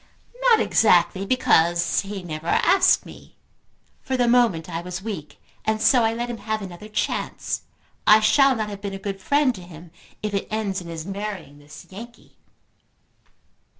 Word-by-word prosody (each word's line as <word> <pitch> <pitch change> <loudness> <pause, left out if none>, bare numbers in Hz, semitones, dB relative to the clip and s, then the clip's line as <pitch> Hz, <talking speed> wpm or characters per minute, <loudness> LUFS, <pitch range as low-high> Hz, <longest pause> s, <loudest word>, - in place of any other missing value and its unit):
"Not 485 -3 +5
exactly; 190 -1 +3
because 170 -8 +2
he 195 -1 -7
never 160 -1 -7
asked 370 - +3
me. - - -14 0.6
For 260 -1 -2
the 245 -1 +2
moment 235 -10 +2
I 165 -1 -4
was 180 +1 -7
weak, 190 -9 -7 0.3
and 220 0 0
so 245 +2 +4
I 225 - +2
let 235 +1 -3
him 240 -2 -6
have 220 -1 -3
another 190 +3 -10
chance. 215 - -3 0.5
I 215 - +8
shall 265 +5 +4
not 215 -2 -3
have 200 -1 -8
been 200 -1 -5
a - - -5
good 195 0 -6
friend 285 +2 +2
to 185 - -10
him 170 -1 -13 0.3
if 210 -1 -3
it 200 - -2
ends 205 -3 -2
in 175 - -10
his 165 -1 -6
marrying 195 -7 -6
this 150 +3 -13
Yankee." 235 +5 -12
200 Hz, 170 wpm, -23 LUFS, 175-225 Hz, 0.6 s, I